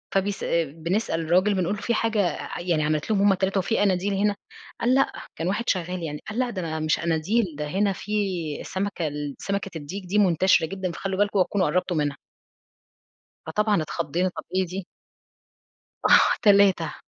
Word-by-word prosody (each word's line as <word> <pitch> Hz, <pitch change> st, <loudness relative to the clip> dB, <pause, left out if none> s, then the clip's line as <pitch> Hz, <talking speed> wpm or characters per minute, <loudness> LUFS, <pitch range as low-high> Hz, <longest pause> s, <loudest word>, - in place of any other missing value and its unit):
فبيس 195 Hz, +1 st, 0 dB, 0.2 s
بنسأل 165 Hz, +5 st, -2 dB
الراجل 180 Hz, +5 st, +3 dB
بنقول 185 Hz, +1 st, 0 dB
له 205 Hz, -, -8 dB
:"في 235 Hz, -, 0 dB
حاجة 225 Hz, -1 st, 0 dB, 0.4 s
يعني 170 Hz, -3 st, 0 dB
عملِت 150 Hz, +3 st, -1 dB
لهم 200 Hz, -2 st, +2 dB
هُم 200 Hz, 0 st, +5 dB
ال3 190 Hz, +1 st, 0 dB
وفي 195 Hz, +4 st, 0 dB
قناديل 195 Hz, 0 st, +1 dB
هنا؟" 205 Hz, +1 st, +1 dB, 0.5 s
قال: 245 Hz, +2 st, +3 dB
"لأ." 270 Hz, -, +3 dB, 0.2 s
كان 165 Hz, -, -3 dB
واحد 205 Hz, +6 st, -1 dB
شغال 180 Hz, -1 st, -1 dB
يعني 150 Hz, -2 st, -4 dB
قال: 215 Hz, +3 st, -4 dB
"لأ، 255 Hz, -1 st, +1 dB
ده 165 Hz, -7 st, -3 dB
مش 155 Hz, 0 st, +1 dB
قناديل، 170 Hz, +8 st, +1 dB
ده 150 Hz, 0 st, -3 dB
هنا 195 Hz, +5 st, +1 dB
في 205 Hz, -, -9 dB, 0.5 s
السمكة 190 Hz, -4 st, -3 dB
ال 145 Hz, -1 st, -5 dB
سمكة 200 Hz, -1 st, -3 dB
الديك 160 Hz, +7 st, -7 dB
دي 190 Hz, +4 st, -1 dB
منتشرة 185 Hz, -3 st, +4 dB
جدًا 190 Hz, +1 st, -4 dB
فخلّوا 190 Hz, +2 st, -4 dB
بالكم 205 Hz, 0 st, +2 dB
اوعوا 185 Hz, -, +3 dB
تكونوا 195 Hz, -2 st, +1 dB
قربتوا 180 Hz, +2 st, 0 dB
منها." 145 Hz, -2 st, -1 dB, 1.3 s
فطبعًا 210 Hz, +3 st, +1 dB
اتخضينا، 170 Hz, +3 st, -1 dB
طب -, -, -8 dB
إيه 190 Hz, 0 st, +2 dB
دي؟ 185 Hz, +1 st, -6 dB, 1.2 s
آه، -, -, +7 dB, 0.2 s
3. 200 Hz, -6 st, +4 dB
185 Hz, 170 wpm, -25 LUFS, 165-200 Hz, 1.3 s, آه